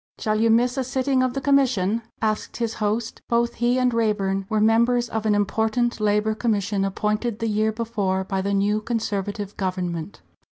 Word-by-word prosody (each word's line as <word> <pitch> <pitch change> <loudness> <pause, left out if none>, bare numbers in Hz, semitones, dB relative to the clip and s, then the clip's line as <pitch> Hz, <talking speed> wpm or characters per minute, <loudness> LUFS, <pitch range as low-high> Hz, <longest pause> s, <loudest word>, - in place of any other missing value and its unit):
"Shall 215 0 0
you 230 - +4
miss 245 +3 +3
a 265 - +1
sitting 260 +1 0
of 255 0 0
the 275 - -2
commission?" 255 -7 +2 0.2
asked 215 -1 -1
his 230 -2 -1
host. 220 +2 -1
Both 235 0 +1
he 240 +1 +3
and 250 -1 +2
Raeburn 195 -4 0
were 215 -1 +1
members 235 +3 +3
of 220 -1 -2
an 210 - +3
important 220 +4 0
Labour 210 +1 +1
Commission 205 -3 0
appointed 210 +3 -1
the 230 - -3
year 215 0 +1
before 210 -4 -1
by 190 0 -2
the 200 +1 -1
new 205 +2 +1
Conservative 205 -3 -3
government. 180 -2 -3
220 Hz, 175 wpm, -23 LUFS, 205-235 Hz, 0.2 s, you